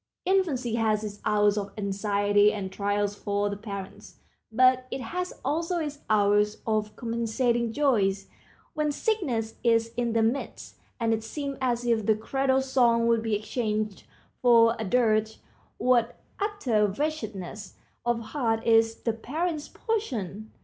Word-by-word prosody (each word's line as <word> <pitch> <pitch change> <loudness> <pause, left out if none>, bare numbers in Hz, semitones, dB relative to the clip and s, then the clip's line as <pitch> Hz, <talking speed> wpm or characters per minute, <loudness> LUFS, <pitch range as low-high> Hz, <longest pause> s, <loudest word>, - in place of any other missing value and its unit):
Infancy 315 - +1
has 220 -2 +1
its 205 -1 -6
hours 210 0 +3
of 200 -1 -5
anxiety 205 0 +2
and 195 -3 -4
trials 205 +1 -1
for 205 0 -1
the - - -3
parents, 200 0 -8 0.4
but 255 +2 +4
it - - -4
has 360 +6 -4
also 335 +4 0
its 295 -3 -4
hours 210 0 +3
of 215 -1 -1
compensating 235 0 0
joys. 210 -8 +1 0.5
When 305 -2 0
sickness 275 - -1
is 230 -1 +3
in 240 -2 -1
the 225 -1 +3
midst, 240 +5 -3 0.2
and 230 -1 +1
it 220 0 -2
seems 280 +4 -5
as 245 -2 0
if 225 -3 +1
the 220 - +5
cradle 265 +4 0
song 240 -3 +3
would 230 -1 +3
be 220 -1 0
exchanged 215 -1 -2 0.4
for 230 -2 +6
a 220 - -2
dirge, 220 0 +2 0.4
what 240 -1 +2 0.2
utter 285 - +1
wretchedness 210 - -4 0.3
of 240 -1 0
heart 225 -6 0
is 225 0 +4
the 230 - -2
parent's 305 +7 -3
portion! 220 - -3
225 Hz, 140 wpm, -27 LUFS, 210-255 Hz, 0.5 s, for